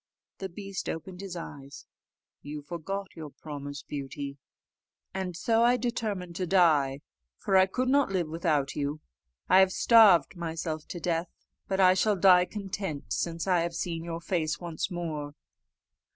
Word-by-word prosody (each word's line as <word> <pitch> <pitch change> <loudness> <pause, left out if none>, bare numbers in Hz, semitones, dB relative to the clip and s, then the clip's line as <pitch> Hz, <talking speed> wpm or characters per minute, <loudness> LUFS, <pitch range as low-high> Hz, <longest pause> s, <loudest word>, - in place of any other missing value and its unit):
The 190 - -4
beast 195 +1 -6
opened 180 +3 -6
his 195 -3 -6
eyes: 140 -4 -9 0.6
"You 150 0 -7
forgot 185 +5 -5
your 160 -3 -7
promise, 145 -1 -8
Beauty, 140 0 -6 0.7
and 185 -3 -4
so 225 +5 +2
I 240 +1 +5
determined 215 -7 -3
to 185 - -2
die; 150 -7 +3 0.4
for 195 - 0
I 190 0 +6
could 255 +7 -1
not 280 -1 +3
live 180 -4 0
without 155 -3 0
you. 145 +1 -2 0.5
I 185 - +6
have 190 -1 +5
starved 195 - +6
myself 160 -2 -4
to 175 - -6
death, 170 0 -1 0.4
but 190 0 -1
I 185 -1 +7
shall 205 +3 +2
die 180 -1 +6
content 190 - -5
since 165 - -2
I 180 -2 +3
have 170 0 -2
seen 165 -1 -3
your 165 0 -5
face 160 -4 -1
once 170 -1 -3
more." 155 -5 -4
170 Hz, 155 wpm, -28 LUFS, 155-190 Hz, 0.7 s, I